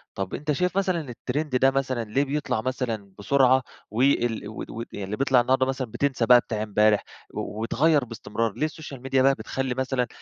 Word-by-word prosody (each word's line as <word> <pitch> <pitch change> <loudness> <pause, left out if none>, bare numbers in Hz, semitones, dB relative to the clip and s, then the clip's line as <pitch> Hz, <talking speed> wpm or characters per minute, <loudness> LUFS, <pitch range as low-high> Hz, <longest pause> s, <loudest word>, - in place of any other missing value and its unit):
طب 95 -1 -4
أنت 150 +1 -2
شايف 180 +5 0
مثلًا 180 -7 0
التريند 145 +3 -3
ده 135 +1 +4
مثلًا 130 -3 -1
ليه 115 +6 0
بيطلع 145 -5 -1
مثلًا 115 -5 -3
بسرعة 130 +4 +4 0.3
و 110 +3 -1
ال 120 -6 +2
ود 110 - -7
ود 115 +1 -5
يعني 100 - -5
اللي 105 +2 -4
بيطلع 135 -2 +4
النهاردة 130 +2 +2
مثلًا 130 -3 -3
بتنْسى 130 0 0
بتاع 120 -3 +4
امبارح 105 0 +3 0.3
و 105 - -5
ويتغيّر 145 +5 +2
باستمرار؟ 115 -1 -3
ليه 155 - -1
السوشيال 150 -4 -7
ميديا 135 0 +1
بقى 135 +1 +5
بتخلّي 135 -1 -3
مثلًا 130 -1 -1
130 Hz, 190 wpm, -25 LUFS, 115-135 Hz, 0.3 s, بقى